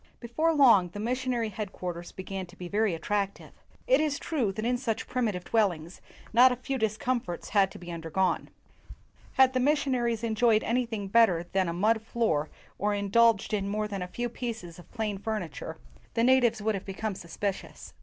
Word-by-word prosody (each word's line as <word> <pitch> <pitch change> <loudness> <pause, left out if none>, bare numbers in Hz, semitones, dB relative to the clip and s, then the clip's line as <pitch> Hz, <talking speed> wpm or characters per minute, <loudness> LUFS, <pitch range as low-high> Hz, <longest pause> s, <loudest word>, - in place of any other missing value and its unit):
Before 310 +8 0
long, 240 - +5
the 205 - -8
missionary 245 0 -1
headquarters 180 -4 -6
began 190 0 -6
to 175 - -16
be 180 -1 -7
very 205 -1 +1
attractive. 200 +4 -2 0.3
It - - +4
is 300 -2 0
true 260 -11 -1
that 215 +3 -4
in 245 +1 +2
such 230 -2 -2
primitive 215 -8 -1
dwellings 180 -7 0 0.3
not 250 +3 +7
a - - 0
few 260 +2 -4
discomforts 220 -3 -2
had 200 -2 +3
to - - -11
be 175 0 -9
undergone. 170 +2 -1 0.8
Had 265 -1 +5
the 255 - +1
missionaries 255 -5 +1
enjoyed 225 -1 +3
anything 230 -4 -1
bet 230 +3 +6
ter 170 -2 -2
than 190 -2 +2
a - - -1
mud 215 +5 +2
floor 220 -10 0 0.3
or 205 +1 +1
indulged 210 +1 +3
in 200 -1 0
more 210 +1 -1
than 200 -2 -5
a 180 - -3
few 240 +6 -3
pieces 225 -8 -6
of 175 - -15
plain 215 -4 -3
furniture, 205 -8 -4 0.4
the 230 - +2
na 260 +2 +6
tives 235 -3 +1
would 220 +1 +1
have 195 - -4
become 205 +2 -4
suspicious. 185 +2 -5
215 Hz, 185 wpm, -28 LUFS, 190-240 Hz, 0.8 s, not